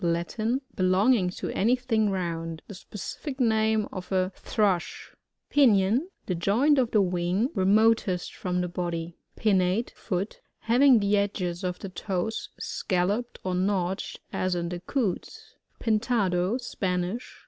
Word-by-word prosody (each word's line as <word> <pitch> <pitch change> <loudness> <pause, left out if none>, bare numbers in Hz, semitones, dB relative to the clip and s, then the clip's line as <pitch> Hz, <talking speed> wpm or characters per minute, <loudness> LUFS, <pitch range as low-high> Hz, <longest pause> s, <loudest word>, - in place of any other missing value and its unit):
— - - -11
Latin. 220 +9 -2
Belonging 185 +2 +3
to 180 - -5
any 230 +6 +3
thing 225 -4 +1
round. 165 -3 -3
The - - -8
specific 260 - -7
nam» 220 -2 +2
of 185 0 -7
a 185 0 +1
Thrush. 200 -5 -1 0.4
Pinion. 240 - +4
— - - -46
The 185 - -1
joint 235 - +3
of 245 -3 +2
the 210 -3 +3
wing 180 +6 0
re 190 -4 0
niotest 210 -3 +3
from 180 -1 -2
the 180 - -1
body. 170 -1 -4 0.2
Pinnate 195 +1 +1
(foot) 195 +1 -4
— - - -53
Having 245 +1 +5
the 200 +1 +2
edges 185 -4 -1
of 180 -1 -2
the 195 - -7
toes 190 +3 -3
scalloped 200 +6 -1
or 185 - -1
notched, 190 0 -1
as 185 -1 0
in 170 -1 -2
the 175 0 -4
Coots. 205 0 -3 0.3
Pintado. 215 -3 +1
— - - -9
Spanish. 185 -1 -3
195 Hz, 150 wpm, -27 LUFS, 180-225 Hz, 0.4 s, Having